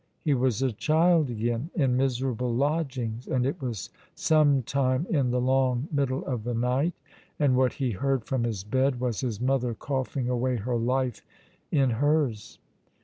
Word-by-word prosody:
He 150 - +2
was 130 -2 +1
a 130 - +1
child 160 - +3
again, 120 +5 -2
in 135 -7 +2
miserable 125 -2 0
lodgings, 130 -4 -1
and 125 -1 0
it 140 +2 -2
was 120 -8 -4 0.2
sometime 140 -2 +2
in 140 -7 +2
the 125 +1 +1
long 130 +1 +1
middle 140 -3 -1
of 125 -5 -3
the 120 +1 -2
night, 125 +8 +1 0.4
and 140 -4 +3
what 130 0 +2
he 130 -3 -1
heard 135 +3 -1
from 130 -3 -1
his 110 -5 -2
bed 130 +4 +1
was 125 -3 -1
his 120 -6 -3
mother 125 -2 0
coughing 130 -1 -2
away 125 +1 0
her 120 +2 -2
life 125 +1 0 0.5
in 135 -4 +3
hers. 140 -3 0
130 Hz, 160 wpm, -27 LUFS, 120-140 Hz, 0.5 s, child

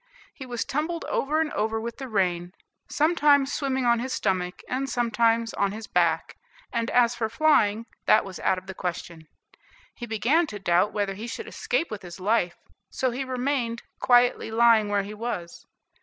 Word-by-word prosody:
He 265 - -9
was 240 -2 -3
tumbled 320 +4 -2
over 300 +3 0
and 320 -2 0
over 220 +1 -1
with 235 +3 -6
the 265 - -5
rain, 180 -5 -1 0.4
sometimes 290 -3 +3
swimming 265 -2 -1
on 235 -1 +3
his 255 +2 -4
stomach 185 -5 -1
and 270 +2 -2
sometimes 230 -1 +1
on 200 0 0
his 220 +1 -7
back; 170 -4 0 0.4
and 230 0 -1
as 240 -1 +4
for 230 -2 -2
flying, 230 -5 +3 0.2
that 215 - +5
was 190 -2 -8
out 190 - +1
of 185 - -8
the 190 - -7
question. 170 -3 -5 0.7
He 240 - -8
began 255 +10 +2
to 210 - -6
doubt 180 0 +2
whether 205 -2 -1
he 215 +5 -7
should 445 - -6
escape 450 - -2
with 210 - -5
his 175 0 -10
life, 185 -3 +1 0.3
so 260 -1 -1
he 255 +3 -3
remained, 255 -2 -2 0.2
quietly 245 -2 +3
lying 225 -2 +4
where 205 -1 +1
he 205 +2 -7
was. 210 -6 -6
230 Hz, 180 wpm, -26 LUFS, 200-260 Hz, 0.7 s, that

